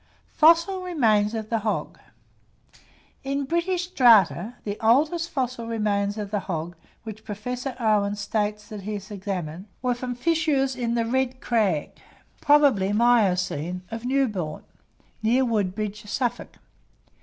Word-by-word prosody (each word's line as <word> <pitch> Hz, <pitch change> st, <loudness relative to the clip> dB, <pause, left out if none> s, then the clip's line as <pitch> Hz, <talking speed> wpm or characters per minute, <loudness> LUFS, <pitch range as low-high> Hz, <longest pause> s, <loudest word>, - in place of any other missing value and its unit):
FOSSIL 335 Hz, +4 st, +4 dB
REMAINS 225 Hz, -, +2 dB
OF 220 Hz, 0 st, -5 dB
THE 225 Hz, -, +1 dB
HOG. 215 Hz, 0 st, -3 dB, 1.2 s
In 275 Hz, +1 st, -1 dB
British 340 Hz, +4 st, 0 dB
strata, 230 Hz, -, +4 dB
the 205 Hz, 0 st, -4 dB
oldest 300 Hz, +9 st, +2 dB
fossil 250 Hz, -3 st, -3 dB
remains 205 Hz, -2 st, -1 dB
of 205 Hz, -2 st, -5 dB
the 210 Hz, -, 0 dB
hog 170 Hz, -2 st, -5 dB, 0.3 s
which 220 Hz, -1 st, -9 dB
Professor 250 Hz, +5 st, -5 dB
Owen 210 Hz, -3 st, +2 dB
states 210 Hz, 0 st, -2 dB
that 210 Hz, -2 st, -7 dB
he 210 Hz, +2 st, -5 dB
has 205 Hz, +1 st, -8 dB
examined, 185 Hz, -3 st, -5 dB, 0.2 s
were 250 Hz, -1 st, +2 dB
from 245 Hz, 0 st, -5 dB
fissures 290 Hz, -2 st, +1 dB
in 235 Hz, -2 st, -1 dB
the 230 Hz, -1 st, +1 dB
red 260 Hz, +1 st, -1 dB
crag 205 Hz, -13 st, 0 dB, 0.5 s
(probably 280 Hz, -10 st, +4 dB
miocene) 185 Hz, -7 st, +1 dB
of 225 Hz, 0 st, -5 dB
Newbourne, 220 Hz, -, -1 dB, 0.6 s
near 245 Hz, +4 st, +3 dB
Woodbridge, 210 Hz, -1 st, -2 dB
Suffolk. 245 Hz, +2 st, -3 dB
225 Hz, 130 wpm, -25 LUFS, 205-260 Hz, 1.2 s, FOSSIL